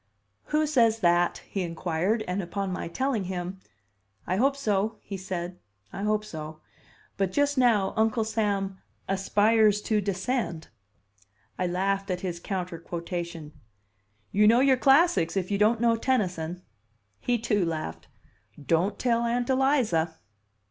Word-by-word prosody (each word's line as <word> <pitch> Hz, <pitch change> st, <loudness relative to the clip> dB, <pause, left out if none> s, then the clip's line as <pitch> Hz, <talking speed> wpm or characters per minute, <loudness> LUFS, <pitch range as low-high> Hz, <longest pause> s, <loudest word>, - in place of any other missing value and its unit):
"Who 305 Hz, +1 st, +1 dB
says 230 Hz, -7 st, +3 dB
that?" 175 Hz, -1 st, +2 dB
he 195 Hz, -, -3 dB
inquired; 175 Hz, +5 st, -1 dB
and 180 Hz, +2 st, -1 dB
upon 195 Hz, +2 st, -3 dB
my 185 Hz, -, -4 dB
telling 240 Hz, +2 st, -1 dB
him, 180 Hz, +1 st, -4 dB, 0.7 s
"I 185 Hz, -, -1 dB
hope 275 Hz, +5 st, +3 dB
so," 215 Hz, -3 st, 0 dB
he 200 Hz, -, -6 dB
said, 180 Hz, -1 st, -5 dB, 0.3 s
"I -, -, -5 dB
hope 210 Hz, 0 st, 0 dB
so. 155 Hz, -4 st, -7 dB, 0.6 s
But 195 Hz, -2 st, 0 dB
just 285 Hz, +5 st, +1 dB
now 230 Hz, -7 st, +3 dB
Uncle 220 Hz, +1 st, +2 dB
Sam 200 Hz, -3 st, -1 dB, 0.3 s
'aspires 210 Hz, +2 st, +3 dB
to 215 Hz, -2 st, +1 dB
descend.'" 200 Hz, -2 st, -2 dB, 0.9 s
I 180 Hz, -, +1 dB
laughed 195 Hz, +3 st, -1 dB
at 180 Hz, -1 st, -2 dB
his 175 Hz, -3 st, -4 dB
counter 180 Hz, -2 st, -4 dB
quotation. 170 Hz, -2 st, -5 dB, 0.8 s
"You 210 Hz, +1 st, +4 dB
know 230 Hz, +3 st, +6 dB
your 270 Hz, 0 st, +5 dB
classics, 270 Hz, -, +3 dB
if 185 Hz, +1 st, -2 dB
you 200 Hz, -, 0 dB
don't 215 Hz, +2 st, +3 dB
know 230 Hz, 0 st, +3 dB
Tennyson." 185 Hz, -8 st, -1 dB, 0.6 s
He, 245 Hz, -, 0 dB
too, 210 Hz, -4 st, +1 dB
laughed. 155 Hz, -, -4 dB, 0.5 s
"Don't 165 Hz, +7 st, +1 dB
tell 235 Hz, -2 st, +1 dB
Aunt 240 Hz, +2 st, 0 dB
Eliza!" 240 Hz, -, +2 dB
195 Hz, 140 wpm, -27 LUFS, 175-230 Hz, 0.9 s, know